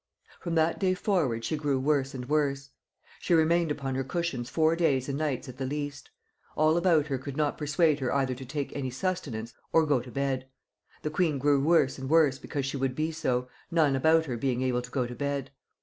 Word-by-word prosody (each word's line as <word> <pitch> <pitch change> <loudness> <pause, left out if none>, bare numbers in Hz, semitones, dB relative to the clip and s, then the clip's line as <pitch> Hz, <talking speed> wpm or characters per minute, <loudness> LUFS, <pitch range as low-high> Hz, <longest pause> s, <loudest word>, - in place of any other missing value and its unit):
"From 170 -2 -3
that 160 +1 +2
day 185 -2 +2
forward 155 - 0
she 155 - -1
grew 145 -3 0
worse 135 -1 0
and 125 -1 -6
worse. 140 -2 0 0.5
She 175 - +2
remained 165 +1 +3
upon 140 -2 -2
her 135 +1 -1
cushions 140 -4 -3
four 160 +3 +2
days 145 -7 +1
and 140 - -2
nights 145 -4 -2
at 130 0 -9
the 135 - -3
least. 145 +1 -5 0.5
All 155 +1 +4
about 170 -4 +3
her 135 -3 -2
could 140 +1 -7
not 150 -2 +1
persuade 150 0 +2
her 130 -3 -1
either 135 -1 +1
to 130 +2 -8
take 140 +2 -4
any 135 -2 -2
sustenance 125 -6 -3 0.2
or 165 -1 +4
go 145 -4 +2
to 125 +1 -9
bed.... 135 0 -2 0.6
The 150 - -2
queen 155 -2 +1
grew 140 0 +3
worse 155 -4 +3
and 135 0 -5
worse 150 -4 +4
because 140 -2 -3
she 135 +1 -3
would 135 -1 -1
be 155 +2 -1
so, 125 -5 -1 0.2
none 155 -5 +3
about 160 +4 +4
her 125 -5 -3
being 130 +1 0
able 125 -1 +1
to 125 - -10
go 125 -1 -1
to 120 - -6
bed. 140 +1 -3
140 Hz, 215 wpm, -28 LUFS, 130-155 Hz, 0.6 s, All